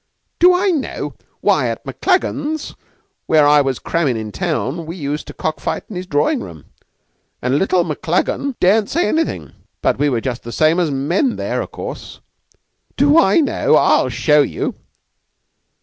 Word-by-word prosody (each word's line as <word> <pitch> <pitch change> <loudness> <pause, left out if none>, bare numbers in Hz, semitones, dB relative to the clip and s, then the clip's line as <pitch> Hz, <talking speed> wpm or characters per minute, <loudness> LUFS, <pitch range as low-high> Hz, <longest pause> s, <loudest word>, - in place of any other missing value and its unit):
"Do 360 +1 +6
I 380 +2 +2
know? 300 -6 -3 0.3
Why, - - +2
at - - -5
Maclagan's, 315 -5 -1 0.5
where 155 -2 +4
I 145 0 +6
was 135 -3 -1
crammin' 150 -8 -1
in 110 -1 -5
town, 160 - -3
we 165 - -6
used 150 -3 -4
to - - -8
cock 155 - -3
fight - - -3
in - - -7
his 180 +1 -5
drawing 150 -2 +1
room, 85 -6 -10 0.7
and 130 +3 0
little 185 -2 +2
Maclagan 180 - -1
daren't 205 +3 +3
say 345 +2 +1
anything. 325 +1 -2 0.3
But - - 0
we 145 0 +2
were 120 -4 0
just 125 0 -4
the 120 - -8
same 155 +6 +2
as 170 -3 +1
men 165 - 0
there, - - -2
of - - -7
course. - - -8 0.8
Do 290 +3 +5
I 330 +1 +4
know? 290 - +2
I'll - - +3
show 150 -1 +3
you." 140 - -2
165 Hz, 165 wpm, -18 LUFS, -, 0.8 s, Do